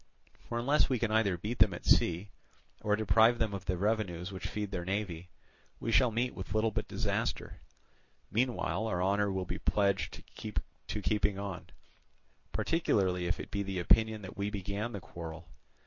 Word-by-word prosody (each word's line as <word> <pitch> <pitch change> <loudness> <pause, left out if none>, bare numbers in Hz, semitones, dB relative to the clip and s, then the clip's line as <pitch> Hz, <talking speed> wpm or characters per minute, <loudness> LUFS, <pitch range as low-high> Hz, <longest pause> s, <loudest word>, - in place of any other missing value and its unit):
For 120 - -1
unless 140 +6 +3
we 130 - +2
can 115 -1 0
either 105 -5 +3
beat 105 +7 -4
them - - +5
at - - -10
sea, 90 +4 +3 0.5
or 105 0 +2
deprive 110 +3 +5
them 110 -3 0
of 100 -1 -5
the 90 - 0
revenues 100 -3 -1
which 95 -1 -5
feed 105 -2 -3
their 90 -3 -2
navy, 90 -3 -3 0.5
we 115 - -2
shall 125 +2 +5
meet 120 +3 0
with 95 +2 -6
little 110 +1 +3
but 110 0 -2
disaster. - - -2 0.7
Meanwhile 115 -1 0
our 90 -4 0
honour 100 +1 +2
will 95 -1 -2
be - - -4
pledged 100 -2 +1 0.6
to 105 - -3
keeping 105 0 +1
on, 100 -3 -5 0.8
particularly 95 - +1
if 85 - 0
it - - -7
be 100 - -1
the 100 -1 -3
opinion 110 +4 +3
that 95 - -8
we 100 0 -1
began 100 +3 -3
the 100 - -5
quarrel. 85 -1 -8
100 Hz, 175 wpm, -32 LUFS, 95-110 Hz, 0.8 s, them